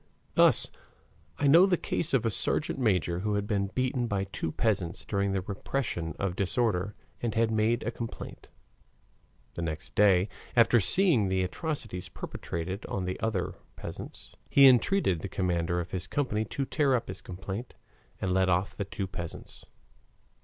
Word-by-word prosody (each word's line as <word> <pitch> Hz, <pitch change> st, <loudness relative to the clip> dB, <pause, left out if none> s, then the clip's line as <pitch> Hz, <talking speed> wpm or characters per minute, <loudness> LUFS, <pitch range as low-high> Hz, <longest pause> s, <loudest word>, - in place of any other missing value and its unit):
Thus -, -, +5 dB, 0.7 s
I 145 Hz, -, -1 dB
know 165 Hz, +7 st, +7 dB
the 180 Hz, -2 st, +2 dB
case 170 Hz, 0 st, -2 dB
of 120 Hz, -3 st, +1 dB
a 115 Hz, -, +2 dB
sergeant 150 Hz, +6 st, +1 dB
major 90 Hz, -7 st, +1 dB
who 105 Hz, +2 st, -1 dB
had 100 Hz, 0 st, -1 dB
been 100 Hz, -2 st, 0 dB
beaten 125 Hz, +2 st, -1 dB
by 100 Hz, -3 st, -1 dB
two 95 Hz, -4 st, -4 dB
peasants 95 Hz, -6 st, -1 dB
during 100 Hz, -1 st, 0 dB
the 95 Hz, -1 st, 0 dB
repression 95 Hz, -, -3 dB
of 95 Hz, -2 st, -2 dB
disorder 100 Hz, -1 st, 0 dB, 0.3 s
and 115 Hz, -3 st, -2 dB
had 115 Hz, 0 st, +2 dB
made 110 Hz, +2 st, +1 dB
a 115 Hz, -, -2 dB
complaint. 115 Hz, -1 st, -7 dB, 1.1 s
The -, -, -5 dB
next 80 Hz, -2 st, -5 dB
day, 95 Hz, -2 st, +4 dB, 0.3 s
after 115 Hz, 0 st, +5 dB
seeing 140 Hz, -, +4 dB
the 95 Hz, 0 st, +1 dB
atrocities 95 Hz, -, -4 dB
perpetrated 90 Hz, +4 st, -5 dB
on 95 Hz, -, -3 dB
the 90 Hz, -, -3 dB
other 110 Hz, -5 st, -1 dB, 0.2 s
peasants, -, -, -9 dB, 0.2 s
he 140 Hz, -, +7 dB
entreated 125 Hz, -, +4 dB
the 95 Hz, -, -5 dB
commander 85 Hz, -2 st, 0 dB
of 85 Hz, -, -5 dB
his 95 Hz, 0 st, -4 dB
company 110 Hz, -3 st, -1 dB
to 135 Hz, +5 st, -3 dB
tear 140 Hz, -1 st, +2 dB
up 120 Hz, -, -2 dB
his 95 Hz, +1 st, -7 dB
complaint 95 Hz, +6 st, -7 dB, 0.4 s
and 95 Hz, -, -1 dB
let 95 Hz, 0 st, +3 dB
off 90 Hz, +2 st, +1 dB
the 100 Hz, -, -3 dB
two 100 Hz, 0 st, -4 dB
peasants. 85 Hz, -3 st, -8 dB
100 Hz, 165 wpm, -29 LUFS, 90-120 Hz, 1.1 s, know